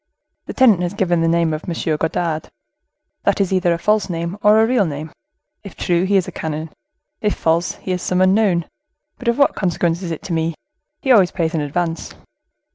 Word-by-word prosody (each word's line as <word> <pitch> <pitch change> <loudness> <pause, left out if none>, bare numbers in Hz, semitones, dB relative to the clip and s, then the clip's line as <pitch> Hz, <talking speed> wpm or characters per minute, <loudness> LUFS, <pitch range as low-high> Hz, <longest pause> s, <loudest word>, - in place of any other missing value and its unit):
The - - -5
tenant 225 -9 +4
has 180 +2 -2
given 175 -4 +1
the 165 - +2
name 165 -1 +2
of 155 - -5
M. 170 - -2 0.2
Godard. 160 0 -2 0.7
That - - +1
is 195 -1 +1
either 180 -2 +2
a 170 - +1
false 210 +3 +1
name 170 +1 -3
or 210 +1 +5
a 220 - +5
real 240 -2 +2
name; 150 +1 -6 0.5
if 200 - -10
true, 175 +1 +1
he 200 +1 +3
is 185 - 0
a - - -5
canon; 155 0 -5 0.5
if 210 -1 0
false, 165 +1 0
he 185 - -6
is 180 -1 -1
some 180 - 0
unknown; 185 -2 +3 0.5
but 250 - -8
of 235 - +2
what 280 - +4
consequence 175 -2 -1
is 180 - -4
it 165 - -5
to 175 - -4
me? 165 0 -1 0.5
he 265 - +2
always 195 -7 +6
pays 165 -2 -2
in 160 - 0
advance. 165 +3 -3
175 Hz, 205 wpm, -19 LUFS, 165-195 Hz, 0.7 s, always